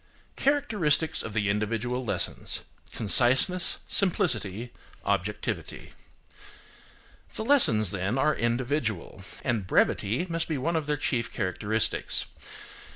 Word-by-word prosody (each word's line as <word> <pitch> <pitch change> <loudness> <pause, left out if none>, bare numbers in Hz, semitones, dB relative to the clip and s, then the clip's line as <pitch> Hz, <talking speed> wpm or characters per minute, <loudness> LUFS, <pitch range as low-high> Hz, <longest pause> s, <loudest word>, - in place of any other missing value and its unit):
CHARACTERISTICS 210 - +1
OF 110 - -7
THE 105 -2 +1
INDIVIDUAL 115 +5 -1
LESSONS:– 115 - -3 0.3
CONCISENESS, 130 - +4
SIMPLICITY, 120 - 0 0.3
OBJECTIVITY. 100 +1 -3 1.4
The 220 - -4
lessons, 115 - +5
then, 100 +5 -2
are 150 +3 +2
individual, 120 - -2 0.2
and 115 -7 -1
brevity 110 - +1
must 165 -1 -2
be 155 - -2
one 165 +6 -1
of 155 -2 -1
their 150 0 0
chief 125 -5 -1
characteristics. 105 +3 -1
120 Hz, 100 wpm, -27 LUFS, 105-160 Hz, 1.4 s, lessons